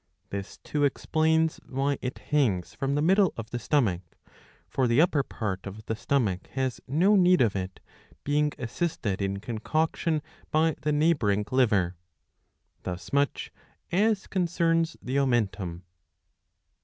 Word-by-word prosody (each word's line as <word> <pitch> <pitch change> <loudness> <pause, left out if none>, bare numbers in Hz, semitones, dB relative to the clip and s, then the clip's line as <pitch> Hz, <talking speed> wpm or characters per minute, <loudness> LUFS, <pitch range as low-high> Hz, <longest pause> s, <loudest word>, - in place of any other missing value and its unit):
.This 100 0 -5
too 150 -1 -2
explains 160 +3 +2
why 135 +1 0
it 125 +1 -4
hangs 115 -12 0
from 135 +1 -1
the 145 - +1
middle 190 +2 +4
of 115 -1 -7
the 120 - -2
stomach; 115 - +1 0.7
for 130 -2 +1
the 120 +3 +3
upper 160 -3 +4
part 100 -8 -4
of 105 +2 -9
the 110 - -2
stomach 110 -7 0
has 130 -3 -2
no 180 +10 +4
need 180 -1 +5
of 110 -5 +3
it, 95 -1 -4 0.4
being 150 +1 +1
assisted 120 - -2
in 100 0 -1
concoction 155 +8 -1 0.3
by 160 +1 +3
the 150 - 0
neighbouring 145 -10 +2
liver. 100 -9 +2 0.8
Thus 90 +2 -6
much 140 0 0 0.4
as 205 +2 +2
concerns 165 -2 +1
the 130 +2 0
omentum. 100 -9 0
135 Hz, 135 wpm, -27 LUFS, 105-160 Hz, 0.8 s, need